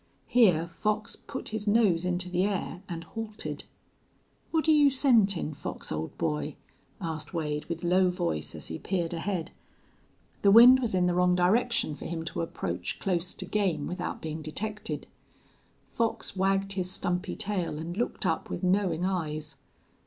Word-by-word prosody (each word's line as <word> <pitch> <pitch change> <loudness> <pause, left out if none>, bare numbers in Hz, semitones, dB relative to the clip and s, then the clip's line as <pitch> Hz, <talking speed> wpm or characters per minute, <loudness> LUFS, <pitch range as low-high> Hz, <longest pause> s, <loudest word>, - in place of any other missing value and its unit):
Here 180 -9 +4
Fox 210 +5 -2
put - - -7
his 215 -1 -4
nose 205 -6 +3
into 180 0 0
the 180 +1 +1
air 195 -2 -2
and 165 -1 -5
halted. 220 +4 -6 0.8
"What're 320 -1 +2
you 295 -2 +6
scentin', 220 - +3
Fox, 145 0 -6
old 80 +1 -4
boy?" 75 -1 -1 0.4
asked 160 0 -4
Wade, 150 -2 -2
with 170 0 -5
low 180 +1 +4
voice, 175 - -2
as - - -5
he 80 - -5
peered 175 -3 -2
ahead. 175 0 -2 0.9
The 200 - +5
wind 240 +5 +9
was 235 -6 -1
in 180 -1 +3
the 180 - +2
wrong 180 0 +3
direction 195 0 +2
for - - -9
him 165 -1 -4
to 165 - -3
approach 165 - -3
close 180 -2 -1
to 185 - -5
game 185 -6 0
without 180 0 -4
being 160 0 -4
detected. 210 +8 -4 0.9
Fox 230 -3 -1
wagged 195 +1 +1
his 185 -2 -2
stumpy 180 +1 -2
tail 195 -7 -2
and 165 +3 -5
looked 230 -1 -2
up 165 -3 0
with 175 - -4
knowing 180 -2 +2
eyes. 155 -5 -3
180 Hz, 160 wpm, -28 LUFS, 165-205 Hz, 0.9 s, wind